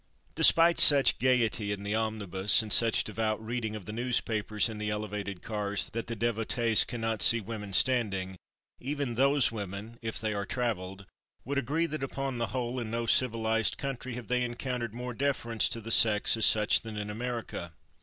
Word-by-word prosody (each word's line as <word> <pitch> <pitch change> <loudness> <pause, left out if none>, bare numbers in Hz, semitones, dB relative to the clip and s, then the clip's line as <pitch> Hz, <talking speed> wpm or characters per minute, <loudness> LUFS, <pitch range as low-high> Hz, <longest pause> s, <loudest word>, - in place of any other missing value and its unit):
Despite 165 +1 +5
such 140 -2 +7
gayety 120 -4 0
in 100 0 -5
the 100 +1 -3
omnibus, 105 -2 +1
and 105 - 0
such 115 -1 +4
devout 110 -1 -3
reading 110 -1 -5
of 105 -4 -9
the - - -7
newspapers 110 -2 0
in 110 -2 -7
the 105 0 -3
elevated 105 -2 -5
cars 105 -2 -1
that 115 +1 -5
the 115 - -5
devotees 115 0 +2
cannot 115 -3 -4
see 115 +2 +5
women 105 -1 -8
standing, 95 -5 0 0.4
even 140 -1 -4
those 135 +2 +2
women, 105 +2 -8
if 110 -1 -3
they 110 -1 -3
are 100 0 -4
travelled, 100 -6 -4 0.4
would 140 +2 -2
agree 150 +6 -1
that, 155 -3 -6
upon 135 -1 -4
the 115 - -1
whole, 125 0 -4
in 115 -2 -5
no 115 +1 -3
civilized 115 -2 +1
country 130 -2 -6
have 125 -1 -9
they 125 0 0
encountered 120 -2 -4
more 125 0 -6
deference 120 -4 -1
to 115 - -2
the 115 +1 -6
sex 110 -1 +5
as 110 - +2
such 105 -1 +3
than 110 -2 -9
in 105 0 -5
America. 115 -7 -6
115 Hz, 180 wpm, -28 LUFS, 105-125 Hz, 0.4 s, such